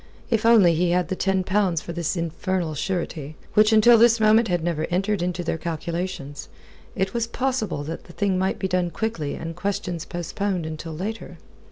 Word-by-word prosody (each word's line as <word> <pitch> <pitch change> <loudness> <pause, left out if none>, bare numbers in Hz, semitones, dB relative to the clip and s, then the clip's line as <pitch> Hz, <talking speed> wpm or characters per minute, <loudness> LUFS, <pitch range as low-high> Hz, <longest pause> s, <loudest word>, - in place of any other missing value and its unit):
If 225 -1 +2
only 205 -7 +6
he 175 +2 +1
had 180 0 +1
the 190 - -1
ten 190 0 +1
pounds 190 -3 +1
for 170 - -7
this 170 +2 -2
infernal 170 0 -2
surety, 155 -2 -3 0.2
which 215 +1 +5
until 225 +1 +7
this 230 0 +5
moment 220 +1 +5
had 175 -2 0
never 160 -2 -1
entered 195 +2 0
into 175 0 -2
their 165 -1 -2
calculations, 170 -2 -4 0.5
it 190 0 -1
was 235 -1 -1
possible 235 - -2
that 160 +3 -6
the 175 - -13
thing 195 -2 0
might 190 +1 0
be 190 - -1
done 180 -1 0
quickly 165 -6 -3
and 165 0 -6
questions 180 -3 -3
postponed 180 +1 -3
until 160 +1 -6
later. 210 +8 -5
180 Hz, 185 wpm, -24 LUFS, 165-210 Hz, 0.5 s, until